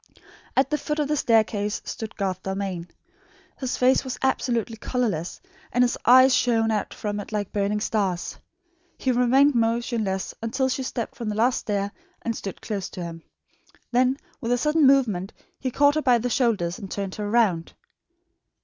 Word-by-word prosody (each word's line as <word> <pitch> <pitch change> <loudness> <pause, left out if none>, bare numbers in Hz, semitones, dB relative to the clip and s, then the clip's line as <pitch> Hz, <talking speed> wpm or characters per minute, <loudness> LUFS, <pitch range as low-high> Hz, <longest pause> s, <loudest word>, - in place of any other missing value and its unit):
At 270 +2 +3
the 300 - +1
foot 300 +2 -3
of 300 -2 0
the 300 - +2
staircase 220 -5 +1
stood 220 -1 -6
Garth 190 -2 -2
Dalmain. 190 -3 -3 0.7
His 260 -2 -2
face 255 +1 +4
was 260 -2 -5
absolutely 240 -4 0
colourless, 215 -10 -2 0.3
and 245 0 +3
his 245 - +1
eyes 255 +2 +8
shone 225 -3 +2
out 210 -1 -1
from 205 -1 -4
it 205 - -8
like 205 -2 -2
burning 205 +1 0
stars. 195 -5 -1 0.6
He 260 - 0
remained 255 +4 +4
motionless 230 -4 0
until 260 +4 0
she 265 - -1
stepped 250 -3 -4
from 235 -3 -5
the 210 - -2
last 240 +4 +2
stair 200 -1 -2 0.3
and 230 -1 -1
stood 195 - -6
close 200 -4 -3
to 180 - -6
him. 165 -1 -7 0.7
Then 255 +2 +3 0.2
with 235 -3 -3
a 245 - +3
sudden 300 +2 +3
movement 220 -9 +2 0.3
he 260 - -2
caught 285 +3 +4
her 310 - 0
by 250 -5 +4
the 240 +1 -2
shoulders 210 -9 +1
and 195 - -8
turned 195 -1 -4
her 205 -1 -4
round. 205 -8 +2
230 Hz, 175 wpm, -25 LUFS, 200-255 Hz, 0.7 s, eyes